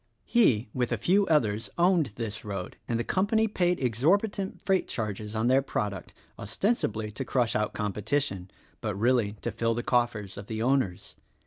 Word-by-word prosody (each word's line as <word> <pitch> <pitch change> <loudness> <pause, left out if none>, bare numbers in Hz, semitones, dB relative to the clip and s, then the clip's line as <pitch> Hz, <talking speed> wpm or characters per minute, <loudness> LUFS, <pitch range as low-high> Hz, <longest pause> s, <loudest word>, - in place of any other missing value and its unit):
He, 125 - +3
with 125 -2 -1
a - - +1
few 195 +2 +3
others, 110 -9 +1
owned 170 - +3
this 110 -2 -5
road; 100 -4 -5
and 115 -1 0
the - - 0
com 190 +10 +1
pany 220 0 +3
paid 180 -1 +2
exorbitant 190 - +1
freight 190 -1 +1
charges 105 -1 -4
on 110 +1 0
their 130 +2 +4
product, 105 -7 -3 0.3
ostensibly 110 - -1
to 135 - -4
crush 125 -3 0
out 105 0 0
competition, 105 -1 -2 0.3
but 105 -3 -2
really 115 -1 +2
to 120 - -1
fill 115 +1 0
the 120 - -2
coffers 115 -6 0
of 100 0 -8
the 110 -1 -4
owners. 125 -6 0
115 Hz, 175 wpm, -28 LUFS, 105-150 Hz, 0.3 s, their